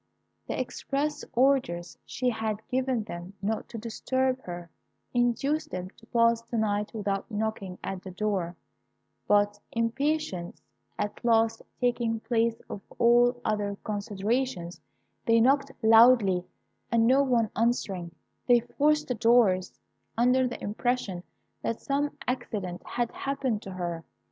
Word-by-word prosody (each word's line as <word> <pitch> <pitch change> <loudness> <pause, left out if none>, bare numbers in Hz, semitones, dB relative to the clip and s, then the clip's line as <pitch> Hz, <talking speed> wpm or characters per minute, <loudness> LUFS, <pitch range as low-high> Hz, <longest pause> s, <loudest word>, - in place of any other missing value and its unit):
The - - -2
express 295 +2 -2
orders 245 -10 +2
she 255 - -2
had 220 -1 -3
given 255 -3 0
them 175 -2 -8
not 215 +3 -2
to 235 - -7
disturb 260 +3 -1
her, 175 -1 -7 0.4
induced 245 +5 +1
them 185 0 -5
to 225 - -21
pass 230 -1 +3
the 230 0 -5
night 210 -1 0
without 200 -2 -2
knocking 210 -4 -3
at 190 -1 -4
the 190 - -8
door; 185 -2 -2 0.7
but 205 0 +3
impatience 230 - -1 0.4
at 205 - -3
last 225 -1 +3 0.2
taking 240 -2 +1
place 230 0 0
of 200 - -6 0.2
all 240 +1 +5
other 205 -2 -1
considerations, 205 -2 -2 0.5
they 230 0 +5
knocked 275 +3 +3
loudly, 225 -5 +6 0.5
and 230 -1 +4
no 260 +4 +5
one 240 -5 +2
answering, 200 -6 0 0.4
they 245 -1 +6
forced 300 +5 +1
the 250 - 0
doors, 225 -5 +3 0.5
under 250 +2 +4
the 245 - -6
impression 210 -3 -1 0.4
that 230 - -2
some 285 +1 -1
accident 200 -8 -3
had 240 -1 -2
happened 270 -6 -2
to 195 - -8
her. 175 -2 -4
225 Hz, 130 wpm, -28 LUFS, 200-250 Hz, 0.7 s, loudly